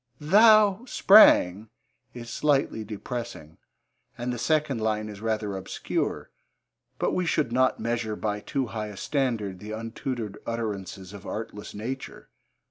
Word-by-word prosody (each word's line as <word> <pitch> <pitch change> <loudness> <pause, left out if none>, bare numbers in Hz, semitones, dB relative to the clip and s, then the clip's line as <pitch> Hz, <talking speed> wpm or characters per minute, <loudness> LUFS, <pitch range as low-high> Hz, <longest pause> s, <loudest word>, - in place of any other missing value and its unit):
'Thou 210 +5 +5
sprang' 110 - +6 0.4
is 120 -1 -9
slightly 140 -5 +1
depressing, 110 -7 -7 0.6
and 125 +1 -3
the 120 - -5
second 150 -3 0
line 110 -1 -1
is 105 -1 -9
rather 110 -2 -2
obscure, 95 0 -3 0.7
but - - 0
we 180 - 0
should 155 -7 0
not 130 +1 +2
measure 115 -2 -2
by 105 -1 -2
too 135 +5 -2
high 110 -1 -3
a 105 -2 -10
standard 115 -10 -2
the 105 - -9
untutored 115 0 -5
utterances 100 -4 -5
of 100 0 -10
artless 105 -2 -6
nature. 125 +6 -6
115 Hz, 130 wpm, -26 LUFS, 105-135 Hz, 0.7 s, sprang